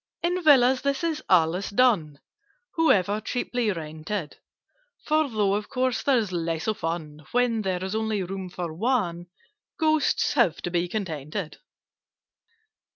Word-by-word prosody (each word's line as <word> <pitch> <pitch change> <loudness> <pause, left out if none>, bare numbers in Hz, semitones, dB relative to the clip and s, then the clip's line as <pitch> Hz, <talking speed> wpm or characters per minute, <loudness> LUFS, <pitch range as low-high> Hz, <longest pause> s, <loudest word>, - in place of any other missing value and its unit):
"In 355 +1 0
Villas 265 -4 +5
this 280 +3 -1
is 320 -2 -1
always 180 +1 +3
done— 200 - +2 0.6
However 210 - +3
cheaply 245 -2 -1
rented: 160 +1 -5 0.7
For, 310 -1 +2
though 210 -4 +1
of 205 +1 -2
course 255 -3 0
there's 235 -8 +1
less 165 -2 -2
of 215 -1 -1
fun 155 -2 -4
When 245 -2 +2
there 185 -2 -2
is 190 +1 -3
only 220 -2 -1
room 190 0 -5
for 175 -2 -5
one, 175 -4 -1 0.5
Ghosts 310 -4 +2
have 235 - +3
to 175 - -3
be 175 0 0
contented. 165 -3 -4
205 Hz, 135 wpm, -25 LUFS, 170-250 Hz, 0.7 s, Villas